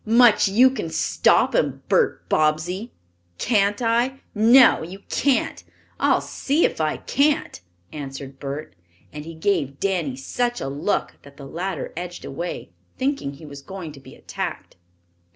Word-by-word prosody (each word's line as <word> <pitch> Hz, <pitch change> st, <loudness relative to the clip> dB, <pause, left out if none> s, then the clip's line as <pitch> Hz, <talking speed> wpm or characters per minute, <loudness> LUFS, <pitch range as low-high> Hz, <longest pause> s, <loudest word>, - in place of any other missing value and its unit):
"Much 230 Hz, -1 st, +5 dB
you 225 Hz, +7 st, +6 dB
can 245 Hz, -10 st, -4 dB
stop -, -, +2 dB
'em, -, -, 0 dB
Bert -, -, +1 dB
Bobbsey." 170 Hz, +8 st, 0 dB, 0.5 s
"Can't 205 Hz, -, +1 dB
I?" 240 Hz, +4 st, +1 dB
"No, 235 Hz, +4 st, +6 dB
you 185 Hz, +5 st, -8 dB
can't." 280 Hz, -3 st, +1 dB, 0.4 s
"I'll -, -, +3 dB
see 290 Hz, +5 st, 0 dB
if -, -, -1 dB
I 155 Hz, -1 st, 0 dB
can't," 285 Hz, -, 0 dB, 0.3 s
answered 135 Hz, -2 st, -7 dB
Bert, 140 Hz, -7 st, -6 dB, 0.4 s
and 150 Hz, 0 st, -7 dB
he 165 Hz, 0 st, -8 dB
gave 160 Hz, -6 st, -1 dB
Danny 175 Hz, -9 st, -1 dB
such 240 Hz, -, -2 dB
a -, -, -3 dB
look 145 Hz, +9 st, -2 dB
that 140 Hz, 0 st, -16 dB
the 140 Hz, -, -9 dB
latter 175 Hz, +4 st, -4 dB
edged 175 Hz, +1 st, -6 dB
away, 170 Hz, -, -5 dB, 0.3 s
thinking 265 Hz, -, -1 dB
he 140 Hz, +3 st, -12 dB
was 140 Hz, -1 st, -10 dB
going 180 Hz, 0 st, -8 dB
to 145 Hz, -, -12 dB
be 135 Hz, -, -14 dB
attacked. -, -, -6 dB
175 Hz, 150 wpm, -23 LUFS, 145-230 Hz, 0.5 s, you